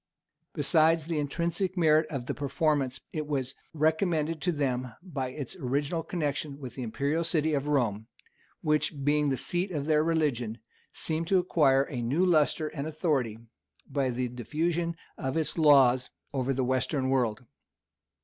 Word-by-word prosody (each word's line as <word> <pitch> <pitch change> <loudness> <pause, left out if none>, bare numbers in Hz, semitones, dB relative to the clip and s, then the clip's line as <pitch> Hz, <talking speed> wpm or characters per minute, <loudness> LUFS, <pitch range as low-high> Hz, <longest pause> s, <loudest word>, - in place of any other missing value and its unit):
Besides 160 -1 +3
the 165 -2 -1
intrinsic 170 +5 -1
merit 155 -2 +4
of 135 -5 -4
the - - -2
performance, 145 -2 0
it 155 -2 -3
was 135 -3 -2 0.2
recommended 160 0 +1
to 180 - +1
them 130 -5 -1
by 140 -8 -3
its 135 +4 -6
original 145 +3 -1
connection 150 -4 -3
with 130 -4 -8
the 130 - -7
imperial 140 +7 -1
city 160 -2 +1
of 145 0 -1
Rome, 115 -7 0 0.5
which, 150 -1 0
being 145 +1 +2
the 135 - 0
seat 175 - 0
of 150 -6 -3
their 155 0 +3
religion, 145 -9 0 0.3
seemed 160 +1 -2
to 190 - +4
acquire 150 -7 +3
a 130 -3 -5
new 140 +10 +1
lustre 155 -2 +2
and 150 -1 -5
authority 150 -8 0 0.5
by 135 -2 0
the 125 +1 -1
diffusion 160 +8 -2 0.2
of 135 +1 -2
its 160 - -1
laws 135 -5 +5 0.2
over 135 -1 0
the 135 0 0
western 130 +1 0
world. 125 -2 0
145 Hz, 155 wpm, -29 LUFS, 130-160 Hz, 0.5 s, laws